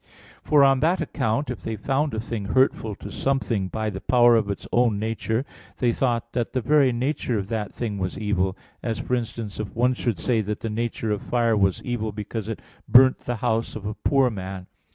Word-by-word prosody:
For 150 Hz, -2 st, +5 dB
on 135 Hz, -1 st, +5 dB
that 170 Hz, +6 st, +2 dB
account, 125 Hz, +1 st, -1 dB
if 125 Hz, -, -6 dB
they 110 Hz, -, -3 dB
found 135 Hz, +5 st, -1 dB
a -, -, -1 dB
thing 110 Hz, -2 st, -4 dB
hurtful 110 Hz, -1 st, +1 dB
to -, -, -9 dB
something 125 Hz, -8 st, 0 dB
by 110 Hz, +2 st, -2 dB
the 95 Hz, -1 st, -6 dB
power 120 Hz, -1 st, +5 dB
of 110 Hz, -3 st, +1 dB
its 100 Hz, -, -4 dB
own 120 Hz, -3 st, +3 dB
nature, 110 Hz, +3 st, -1 dB, 0.3 s
they 120 Hz, -2 st, +2 dB
thought 120 Hz, -2 st, -1 dB
that 120 Hz, -2 st, -2 dB
the 130 Hz, -, +1 dB
very 140 Hz, +2 st, +4 dB
nature 125 Hz, -1 st, -1 dB
of 100 Hz, -1 st, -4 dB
that 110 Hz, -3 st, -2 dB
thing 105 Hz, -4 st, -4 dB
was 95 Hz, -1 st, -3 dB
evil; 100 Hz, -2 st, 0 dB, 0.2 s
as, 115 Hz, -3 st, -2 dB
for 125 Hz, +2 st, -4 dB
instance, 115 Hz, -4 st, -3 dB
if 110 Hz, -2 st, -5 dB
one 125 Hz, +2 st, +3 dB
should 120 Hz, -4 st, -1 dB
say 120 Hz, -3 st, +1 dB
that 105 Hz, 0 st, -4 dB
the 115 Hz, -, -3 dB
nature 115 Hz, 0 st, -2 dB
of 105 Hz, -, -1 dB
fire 115 Hz, -2 st, +1 dB
was 95 Hz, -3 st, +1 dB
evil 110 Hz, -3 st, -2 dB
because 105 Hz, +1 st, -5 dB
it 115 Hz, -, -5 dB, 0.3 s
burnt 130 Hz, +1 st, +7 dB
the 120 Hz, -, -3 dB
house 110 Hz, +1 st, 0 dB
of 105 Hz, -2 st, -7 dB
a 105 Hz, -, -2 dB
poor 135 Hz, +2 st, +2 dB
man. 95 Hz, -2 st, -6 dB
115 Hz, 215 wpm, -24 LUFS, 105-125 Hz, 0.3 s, burnt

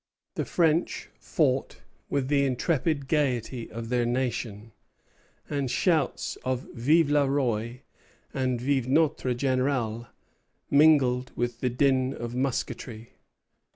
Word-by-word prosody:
The -, -, -2 dB
French 165 Hz, -1 st, +1 dB
fought -, -, 0 dB, 0.3 s
with 140 Hz, -2 st, 0 dB
the 140 Hz, 0 st, +2 dB
intrepid 140 Hz, +2 st, 0 dB
gayety 130 Hz, -5 st, -1 dB
of 115 Hz, 0 st, -7 dB
their 125 Hz, -1 st, +1 dB
nation, 120 Hz, -3 st, -2 dB, 0.8 s
and 140 Hz, -3 st, -2 dB
shouts 165 Hz, +4 st, 0 dB
of 130 Hz, -1 st, -2 dB
Vive 145 Hz, +6 st, +3 dB
le 145 Hz, -2 st, +3 dB
Roi! 125 Hz, -2 st, -1 dB, 0.5 s
and 130 Hz, -2 st, -1 dB
Vive 130 Hz, 0 st, 0 dB
notre 140 Hz, -3 st, +2 dB
Général! 130 Hz, -3 st, -1 dB, 0.6 s
mingled 140 Hz, -4 st, +4 dB
with 120 Hz, -1 st, -2 dB
the 125 Hz, -, 0 dB
din 130 Hz, +1 st, +1 dB
of 120 Hz, 0 st, -6 dB
musketry. 120 Hz, -3 st, -3 dB
130 Hz, 115 wpm, -27 LUFS, 120-140 Hz, 0.8 s, mingled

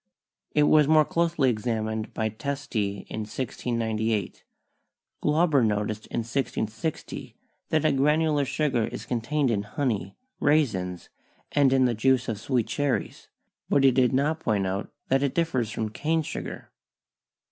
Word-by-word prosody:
It 150 Hz, -, +5 dB
was 150 Hz, 0 st, +5 dB
more 155 Hz, 0 st, +5 dB
closely 165 Hz, -6 st, +2 dB
examined 110 Hz, -1 st, -2 dB
by 110 Hz, -1 st, -1 dB
Testi 110 Hz, -5 st, -3 dB
in -, -, -5 dB
1698. 110 Hz, -1 st, -2 dB, 0.8 s
Glauber 150 Hz, -3 st, +3 dB
noticed 105 Hz, 0 st, -1 dB
in 120 Hz, -, -2 dB
1660 115 Hz, +3 st, -3 dB, 0.3 s
that 155 Hz, -1 st, +1 dB
a 155 Hz, -, +5 dB
granular 150 Hz, +2 st, +2 dB
sugar 135 Hz, -5 st, 0 dB
is -, -, -7 dB
contained 130 Hz, +3 st, 0 dB
in 105 Hz, -3 st, +1 dB
honey, 105 Hz, -3 st, -2 dB, 0.2 s
raisins 105 Hz, -, +1 dB, 0.4 s
and 140 Hz, -2 st, +4 dB
in 130 Hz, -1 st, +4 dB
the 120 Hz, -, +2 dB
juice 130 Hz, +3 st, +2 dB
of 110 Hz, -4 st, -3 dB
sweet 125 Hz, -1 st, 0 dB
cherries, 145 Hz, -3 st, -2 dB, 0.4 s
but 140 Hz, -, +3 dB
he 135 Hz, -, +7 dB
did 125 Hz, 0 st, +3 dB
not 145 Hz, +4 st, +1 dB
point 105 Hz, -8 st, 0 dB
out 95 Hz, +2 st, -3 dB, 0.2 s
that 135 Hz, +1 st, +3 dB
it 140 Hz, -1 st, 0 dB
differs 135 Hz, -9 st, 0 dB
from 110 Hz, -1 st, -3 dB
cane 160 Hz, +8 st, 0 dB
sugar. -, -, -6 dB
130 Hz, 140 wpm, -26 LUFS, 110-145 Hz, 0.8 s, he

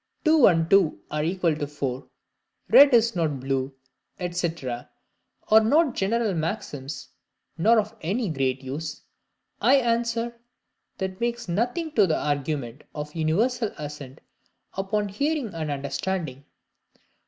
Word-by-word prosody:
"two 310 Hz, -4 st, +6 dB
and 165 Hz, -3 st, +3 dB
two 195 Hz, -3 st, +4 dB
are 150 Hz, 0 st, -1 dB
equal 170 Hz, -1 st, +1 dB
to 150 Hz, -1 st, -3 dB
four," 135 Hz, -3 st, -4 dB, 0.6 s
"red 285 Hz, 0 st, +8 dB
is 230 Hz, -2 st, +4 dB
not 155 Hz, -5 st, 0 dB
blue," 135 Hz, 0 st, -2 dB, 0.6 s
&c., 175 Hz, -1 st, 0 dB, 1.0 s
are 220 Hz, -, +9 dB
not 285 Hz, +4 st, +3 dB
general 220 Hz, +1 st, 0 dB
maxims 155 Hz, -5 st, -4 dB, 0.5 s
nor 220 Hz, +8 st, +4 dB
of 215 Hz, +1 st, -3 dB
any 205 Hz, +8 st, -1 dB
great 135 Hz, -4 st, -1 dB
use, 145 Hz, +3 st, -5 dB, 0.6 s
I 270 Hz, -, +5 dB
answer, 235 Hz, -2 st, 0 dB, 0.6 s
that 190 Hz, +1 st, -4 dB
makes 235 Hz, -1 st, -2 dB
nothing 245 Hz, -, -1 dB
to 210 Hz, -9 st, +4 dB
the 160 Hz, -, +1 dB
argument 140 Hz, -3 st, -2 dB
of 150 Hz, 0 st, -5 dB
universal 205 Hz, +9 st, 0 dB
assent 145 Hz, -3 st, -8 dB, 0.5 s
upon 205 Hz, +2 st, -1 dB
hearing 280 Hz, -, -1 dB
and 160 Hz, -2 st, -4 dB
understanding. 140 Hz, +1 st, -3 dB
180 Hz, 125 wpm, -25 LUFS, 150-230 Hz, 1.0 s, are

